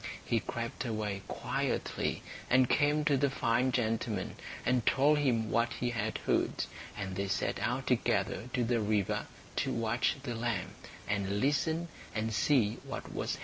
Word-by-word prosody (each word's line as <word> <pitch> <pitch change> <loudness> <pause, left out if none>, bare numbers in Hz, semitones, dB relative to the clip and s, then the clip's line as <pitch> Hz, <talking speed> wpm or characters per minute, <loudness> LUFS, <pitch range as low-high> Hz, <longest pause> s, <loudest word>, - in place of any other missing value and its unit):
He 115 - +2
crept 115 +2 -4
away 105 -4 -2
quietly, - - -1 0.3
and 130 0 +5
came 145 +2 +3
to 145 -2 +4
the 140 +1 +3
fine 125 0 +2
gentleman, 110 -4 -1 0.3
and 125 -1 +3
told 145 +5 +4
him 115 -6 +1
what 115 +1 +2
he 120 -1 -1
had 110 -2 -1
heard; - - +1 0.3
and 95 -2 -4
they 100 +1 -1
set - - 0
out 130 +2 -1
together 115 -2 +1
to 125 - +2
the 120 0 +2
river, 105 -2 0 0.3
to - - +1
watch 115 +1 +1
the 125 -4 -3
lamb, 115 -5 -2 0.3
and 100 0 0
listen, 160 +6 +1 0.3
and 110 +1 -1
see 115 -3 +3
what - - -6
was - - -1
happening. - - -12
115 Hz, 160 wpm, -32 LUFS, 110-130 Hz, 0.3 s, and